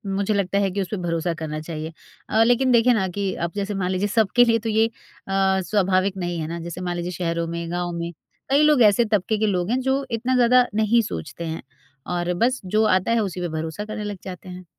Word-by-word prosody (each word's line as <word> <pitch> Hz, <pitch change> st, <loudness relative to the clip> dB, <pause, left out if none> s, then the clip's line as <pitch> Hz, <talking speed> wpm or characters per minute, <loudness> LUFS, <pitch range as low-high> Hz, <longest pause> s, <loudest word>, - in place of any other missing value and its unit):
मुझे 200 Hz, +2 st, 0 dB
लगता 200 Hz, 0 st, 0 dB
है 195 Hz, -1 st, +1 dB
कि 200 Hz, +1 st, -2 dB
उस 185 Hz, -, -3 dB
पे 210 Hz, -, -2 dB
भरोसा 170 Hz, -1 st, -1 dB
करना 155 Hz, -1 st, -5 dB
चाहिए। 160 Hz, 0 st, -6 dB, 0.4 s
अ, 220 Hz, +1 st, +4 dB
लेकिन 245 Hz, +2 st, +3 dB
देखिए 240 Hz, +1 st, +5 dB
ना 190 Hz, -4 st, +1 dB
कि 195 Hz, +1 st, -2 dB
अब 170 Hz, -, -1 dB
जैसे 200 Hz, 0 st, -2 dB
मान 185 Hz, -1 st, -1 dB
लीजिए 190 Hz, +2 st, 0 dB
सबके 220 Hz, +3 st, +3 dB
लिए 230 Hz, -1 st, +3 dB
तो 225 Hz, +1 st, -4 dB
ये 220 Hz, +1 st, +3 dB
अ, -, -, -14 dB, 0.7 s
स्वाभाविक 190 Hz, 0 st, +1 dB
नहीं 175 Hz, -2 st, -3 dB
है 155 Hz, -, -3 dB
ना? 170 Hz, +1 st, -5 dB
जैसे 170 Hz, +2 st, -7 dB
मान 175 Hz, -1 st, -2 dB
लीजिए 175 Hz, +1 st, -3 dB
शहरों 170 Hz, -1 st, -2 dB
में 170 Hz, 0 st, -4 dB
गाँव 175 Hz, 0 st, -2 dB
में, 170 Hz, 0 st, -4 dB, 0.4 s
कई 280 Hz, +2 st, +4 dB
लोग 300 Hz, -4 st, +5 dB
ऐसे 210 Hz, +3 st, +5 dB
तबके 210 Hz, 0 st, 0 dB
के 215 Hz, -, +2 dB
लोग 180 Hz, -1 st, 0 dB
हैं 255 Hz, -, +2 dB
जो 265 Hz, +1 st, 0 dB
इतना 245 Hz, +3 st, 0 dB
ज़्यादा 250 Hz, 0 st, +5 dB
नहीं 220 Hz, +2 st, +3 dB
सोचते 125 Hz, -, -6 dB
हैं, 160 Hz, 0 st, -4 dB, 0.5 s
और 175 Hz, 0 st, -1 dB
बस 255 Hz, +1 st, 0 dB
जो 215 Hz, +4 st, +2 dB
आता 185 Hz, +3 st, +2 dB
है 230 Hz, -, +3 dB
उसी 180 Hz, -2 st, -4 dB
पे 175 Hz, -, -1 dB
भरोसा 160 Hz, +6 st, -4 dB
करने 215 Hz, 0 st, -5 dB
लग 205 Hz, -2 st, -4 dB
जाते 185 Hz, 0 st, -8 dB
हैं। 180 Hz, 0 st, -9 dB
195 Hz, 240 wpm, -23 LUFS, 175-220 Hz, 0.7 s, देखिए